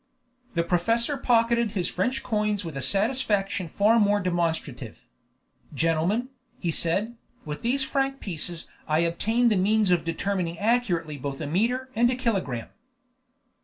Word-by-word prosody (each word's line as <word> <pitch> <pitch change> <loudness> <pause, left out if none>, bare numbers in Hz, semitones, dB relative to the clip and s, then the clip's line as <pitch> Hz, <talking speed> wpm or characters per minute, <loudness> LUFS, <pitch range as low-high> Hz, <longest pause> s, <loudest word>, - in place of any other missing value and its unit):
The 170 - +2
professor 225 - +1
pocketed 235 -3 +2
his 180 -4 0
French 250 +10 -1
coins 210 -4 0
with 160 -4 -6
a 135 - -3
satisfaction 200 - 0
far 210 +7 +3
more 205 -1 +3
demonstrative. 165 - -2 0.7
"Gentlemen," 165 +10 +1 0.3
he 170 - -1
said, 200 +9 -1 0.3
"with 150 -1 -5
these 260 +4 +1
franc 270 0 -1
pieces 170 -2 -4 0.2
I 155 +1 +2
obtain 220 +8 +2
the 210 - +2
means 205 +1 +3
of 175 -2 +3
determining 170 0 -2
accurately 185 -8 0
both 135 0 -4
a 155 - -3
meter 240 - 0
and 240 +2 +4
a 250 - +1
kilogramme." 195 - -2
200 Hz, 140 wpm, -26 LUFS, 165-235 Hz, 0.7 s, and